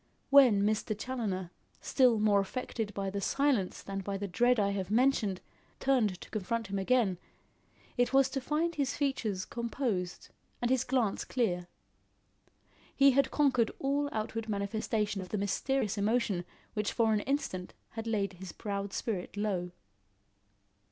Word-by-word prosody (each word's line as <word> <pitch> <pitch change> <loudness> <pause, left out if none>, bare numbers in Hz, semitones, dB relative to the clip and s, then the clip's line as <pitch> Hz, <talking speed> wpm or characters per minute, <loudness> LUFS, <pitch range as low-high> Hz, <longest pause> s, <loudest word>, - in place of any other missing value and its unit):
When 250 -8 +7
Mr. 215 0 0
Challoner, 210 -7 -3 0.3
still 250 -4 +3
more 210 -1 +4
affected 220 +1 -3
by 195 -1 -2
the 200 0 -3
silence 270 -5 +1
than 195 0 -4
by 195 +1 -3
the 200 +1 -3
dread 245 +6 +3
I 200 -1 +2
have 195 -2 -3
mentioned, 220 -5 +2 0.4
turned 230 -9 +2
to - - -10
confront 215 0 -2
him 200 - -1
again, 195 -3 +2 0.8
it 245 0 +2
was 270 -1 +5
to 270 - -2
find 310 +5 0
his 280 -3 -1
features 220 -9 -1
composed 230 -7 -3 0.3
and 240 +1 0
his 260 -2 +3
glance 250 -6 0
clear. 180 -8 -1 1.3
He 275 0 +6
had 270 0 +3
conquered 255 -6 +3
all 285 +1 0
outward 220 +1 -3
manifestation 210 0 -1
of 185 - -8
the 210 - -2
mysterious 210 +2 0
emotion 205 -4 +1 0.3
which 210 -1 -1
for 225 -1 +3
an 210 - +2
instant 205 -8 -2 0.2
had 225 0 -6
laid 200 -4 0
his 180 0 -8
proud 200 0 -4
spirit 205 -3 -3
low. 195 -4 -1
215 Hz, 150 wpm, -31 LUFS, 195-255 Hz, 1.3 s, When